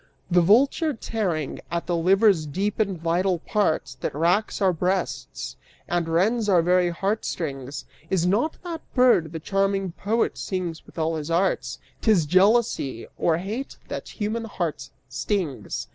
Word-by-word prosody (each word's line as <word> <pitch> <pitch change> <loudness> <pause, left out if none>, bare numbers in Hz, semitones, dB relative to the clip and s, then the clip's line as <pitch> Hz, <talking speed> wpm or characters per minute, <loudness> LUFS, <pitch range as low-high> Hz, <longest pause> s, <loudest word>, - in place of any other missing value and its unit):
The 175 0 +5
vulture 275 - +3
tearing; 185 - -2
at 170 0 -2
the 175 - 0
liver's 185 -1 +4
deep 195 +9 -2
and 195 -5 0
vital 175 +3 +1
parts, 160 -7 0
That 130 - -5
wracks 175 +7 +1
our 190 -3 +3
breasts 180 +2 -2 0.3
and 175 -2 0
rends 210 +7 +2
our 175 -4 +5
very 180 0 +3
heartstrings 155 - -3 0.2
Is 180 -3 +1
not 225 - +1
that 335 -3 -5
bird 245 - +4
the 165 - -5
charming 195 +1 0
poet 215 +6 -1
sings 180 -4 -4
with - - -17
all 160 0 0
his 150 0 -5
arts; 175 +4 0 0.2
'T'is 205 -8 +4
jealousy 185 - +2
or 160 -1 +2
hate 215 +10 -5
that - - -5
human 220 +2 -1
hearts 175 -7 -4 0.2
stings. 165 0 -3
185 Hz, 145 wpm, -24 LUFS, 165-210 Hz, 0.3 s, The